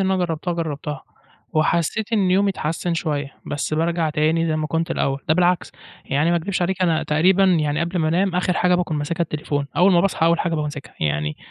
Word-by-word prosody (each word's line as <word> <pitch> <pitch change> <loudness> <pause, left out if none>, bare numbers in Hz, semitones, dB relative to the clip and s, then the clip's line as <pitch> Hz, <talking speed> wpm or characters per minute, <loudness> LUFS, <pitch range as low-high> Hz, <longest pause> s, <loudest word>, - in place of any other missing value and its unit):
أنا 190 - +2
جرَّبتها، 175 -1 -2
جرَّبتها 150 -4 -4 0.5
وحسّيت 170 +8 0
إن 200 -4 +2
يومي 195 +2 +3
اتحسَّن 170 -1 -2
شوية، 145 -4 -3
بس 145 +1 -2
بارجع 165 0 0
تاني 160 +2 +1
زي 155 -1 0
ما 155 - -1
كنت 165 +3 -2
الأوَّل. 135 -4 -1
ده 155 - +4
بالعكس 180 0 +1 0.3
يعني، 145 +5 +1
ما 175 - +3
أكدِبِش 180 +2 -2
عليكِ، 185 +1 -1
أنا 165 -3 +2
تقريبًا 180 +6 +3
يعني 155 -5 +2
قبل 170 +2 -1
ما 155 -2 +1
أنام، 180 +3 +1
آخِر 180 0 +1
حاجة 180 0 +2
باكون 175 -3 -1
ماسِكها 160 +4 -2
التليفون، 150 -3 -2
أوَّل 185 +3 +5
ما 175 - +5
باصحى، 180 -3 +1
أوَّل 170 0 +3
حاجة 170 - -1
بامسِكها. 150 -2 -5
يعني 75 0 -1
165 Hz, 205 wpm, -21 LUFS, 150-180 Hz, 0.5 s, أوَّل